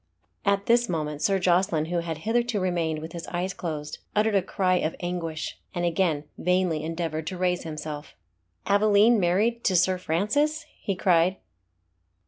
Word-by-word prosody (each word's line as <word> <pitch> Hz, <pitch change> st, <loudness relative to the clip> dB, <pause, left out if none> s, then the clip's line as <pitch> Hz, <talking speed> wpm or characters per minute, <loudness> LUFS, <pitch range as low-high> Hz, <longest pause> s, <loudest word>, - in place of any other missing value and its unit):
At 200 Hz, 0 st, +2 dB
this 240 Hz, 0 st, +3 dB
moment 150 Hz, -3 st, -2 dB
Sir 195 Hz, -1 st, +3 dB
Jocelyn, 180 Hz, -3 st, +2 dB
who 175 Hz, +1 st, -1 dB
had 165 Hz, -2 st, -4 dB
hitherto 235 Hz, -1 st, +1 dB
remained 170 Hz, -4 st, 0 dB
with 160 Hz, +1 st, -7 dB
his 170 Hz, -1 st, -7 dB
eyes 180 Hz, +2 st, -2 dB
closed, 155 Hz, -4 st, -5 dB, 0.2 s
uttered 215 Hz, +1 st, +3 dB
a 195 Hz, -, +4 dB
cry 185 Hz, 0 st, +1 dB
of 160 Hz, -2 st, -1 dB
anguish, 170 Hz, -3 st, -4 dB, 0.2 s
and 175 Hz, 0 st, 0 dB
again 165 Hz, -3 st, +1 dB, 0.2 s
vainly 180 Hz, -3 st, +1 dB
endeavoured 160 Hz, -1 st, -3 dB
to 185 Hz, -, -4 dB
raise 180 Hz, -1 st, +1 dB
himself. 155 Hz, -1 st, -6 dB, 0.5 s
"Aveline 210 Hz, +3 st, +5 dB
married 210 Hz, +7 st, +1 dB
to 185 Hz, -, +3 dB
Sir 185 Hz, +1 st, +3 dB
Francis?" 285 Hz, -, 0 dB, 0.2 s
he 195 Hz, -, -1 dB
cried. 180 Hz, 0 st, +3 dB
180 Hz, 155 wpm, -26 LUFS, 165-200 Hz, 0.5 s, Aveline